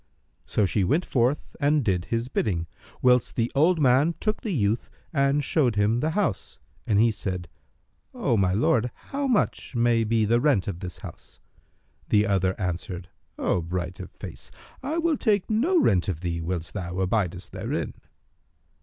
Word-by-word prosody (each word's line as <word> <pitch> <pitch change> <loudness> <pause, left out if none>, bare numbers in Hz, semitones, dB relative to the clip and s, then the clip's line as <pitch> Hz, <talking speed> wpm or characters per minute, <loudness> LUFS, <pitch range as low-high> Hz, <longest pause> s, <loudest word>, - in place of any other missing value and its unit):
So 105 - +2
she 95 +2 +1
went 150 - +1
forth 130 +3 0
and 145 -2 +2
did 90 -4 +1
his 115 +1 -2
bidding; 90 -9 -1 0.4
whilst 125 -1 +3
the 115 0 0
old 160 +4 +3
man 140 +4 +4
took 215 0 -1
the 230 - -4
youth 110 - 0 0.2
and 140 0 +2
showed 125 -5 +2
him 105 +3 +2
the 155 +5 0
house; 200 - -1 0.3
and 105 -2 +3
he 115 +1 +5
said, 90 -4 -4 0.6
"O 120 - 0
my 95 -3 +2
lord, 115 +4 +2 0.2
how 280 0 -1
much 230 - 0
may 120 -1 +3
be 110 0 +2
the 120 +3 +2
rent 135 -10 +2
of 95 -4 -4
this 90 -2 -6
house?" - - -11 0.7
The 105 0 +4
other 95 -1 +1
answered, 90 -1 -4 0.3
"O 90 - +1
bright 90 +1 -4
of - - -7
face, - - -9 0.3
I 295 +5 -2
will 335 -3 +1
take 210 -3 +1
no 310 - +3
rent 90 - +3
of 90 -4 -3
thee 85 -2 -2
whilst 85 0 -3
thou 90 -3 -4
abidest 95 -1 -1
therein." - - -3
115 Hz, 170 wpm, -26 LUFS, 95-145 Hz, 0.7 s, he